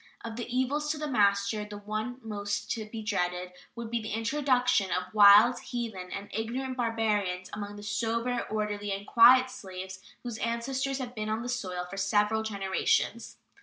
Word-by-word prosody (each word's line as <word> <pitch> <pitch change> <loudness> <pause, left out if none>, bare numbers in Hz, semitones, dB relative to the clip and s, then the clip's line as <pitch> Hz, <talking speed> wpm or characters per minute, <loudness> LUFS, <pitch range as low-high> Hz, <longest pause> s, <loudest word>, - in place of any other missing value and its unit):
Of 225 -1 -5
the 240 0 -5
evils 265 +4 0
to 310 - 0
the 300 0 -3
master, 205 -3 +2
the 210 0 -8
one 215 +4 -4
most 205 -2 -3
to 220 -2 -2
be 220 0 -6
dreaded 180 -3 -1 0.2
would 235 -1 -6
be 235 -1 0
the 215 - -5
introduction 250 -3 +2
of 180 +1 -2
wild, 210 +4 +8
heathen, 220 -7 -5
and 200 +1 -5
ignorant 250 +4 -3
barbarians 215 -6 -1
among 205 0 -5
the 205 - -10
sober, 230 +3 -1
orderly, 210 -1 -2
and 195 +1 -4
quiet 255 +3 +7
slaves 190 -4 -8 0.2
whose 235 -3 -5
ancestors 260 +4 -1
have 250 -2 -5
been 215 -2 -4
on 220 +2 -1
the 245 - -5
soil 185 -8 -3
for 195 +2 -8
several 210 +3 +2
generations. 205 +2 -1
220 Hz, 170 wpm, -29 LUFS, 200-240 Hz, 0.2 s, wild